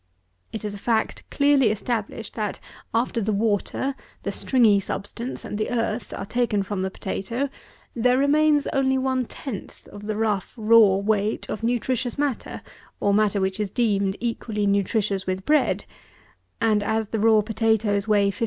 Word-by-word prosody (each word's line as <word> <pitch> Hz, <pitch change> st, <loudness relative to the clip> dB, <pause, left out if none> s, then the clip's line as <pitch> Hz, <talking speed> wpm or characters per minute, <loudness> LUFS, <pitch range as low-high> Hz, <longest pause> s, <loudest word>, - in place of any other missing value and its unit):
It 220 Hz, -, -5 dB
is 205 Hz, -, -3 dB
a 205 Hz, -, -7 dB
fact 225 Hz, +1 st, -1 dB
clearly 280 Hz, -4 st, +4 dB
established, 220 Hz, 0 st, -3 dB
that, 210 Hz, -3 st, -3 dB, 0.3 s
after 230 Hz, 0 st, 0 dB
the 215 Hz, +1 st, 0 dB
water, 215 Hz, +6 st, 0 dB, 0.3 s
the -, -, -2 dB
stringy 225 Hz, -6 st, +3 dB
substance, 230 Hz, +5 st, -5 dB
and 210 Hz, -, -5 dB
the 215 Hz, -, -1 dB
earth, 230 Hz, -2 st, -2 dB
are 195 Hz, -, -4 dB
taken 215 Hz, -2 st, 0 dB
from 195 Hz, -1 st, -3 dB
the 190 Hz, -, -1 dB
potatoe, 230 Hz, +8 st, -3 dB, 0.5 s
there 250 Hz, +2 st, +3 dB
remains 295 Hz, +1 st, +3 dB
only 265 Hz, -1 st, +2 dB
one 260 Hz, -1 st, 0 dB
tenth 230 Hz, -3 st, -7 dB
of 205 Hz, 0 st, -10 dB
the 215 Hz, -, -1 dB
rough 210 Hz, -3 st, -1 dB
raw 220 Hz, -3 st, +6 dB
weight 205 Hz, +1 st, 0 dB
of 215 Hz, -, -4 dB
nutritious 245 Hz, +1 st, -1 dB
matter, 280 Hz, -4 st, -2 dB, 0.4 s
or 200 Hz, -, +2 dB
matter 210 Hz, -1 st, +2 dB
which 190 Hz, +1 st, -1 dB
is 210 Hz, -2 st, -1 dB
deemed 200 Hz, -3 st, +1 dB
equally 225 Hz, -3 st, -2 dB
nutritious 200 Hz, 0 st, 0 dB
with 185 Hz, 0 st, -2 dB
bread, 305 Hz, 0 st, +2 dB, 0.7 s
and, 215 Hz, -2 st, +2 dB
as 220 Hz, +1 st, -1 dB
the 225 Hz, -, -2 dB
raw 220 Hz, 0 st, +5 dB
potatoes 220 Hz, -2 st, +1 dB
weigh 205 Hz, -2 st, +3 dB
56lb. -, -, -13 dB
220 Hz, 160 wpm, -24 LUFS, 205-240 Hz, 0.7 s, raw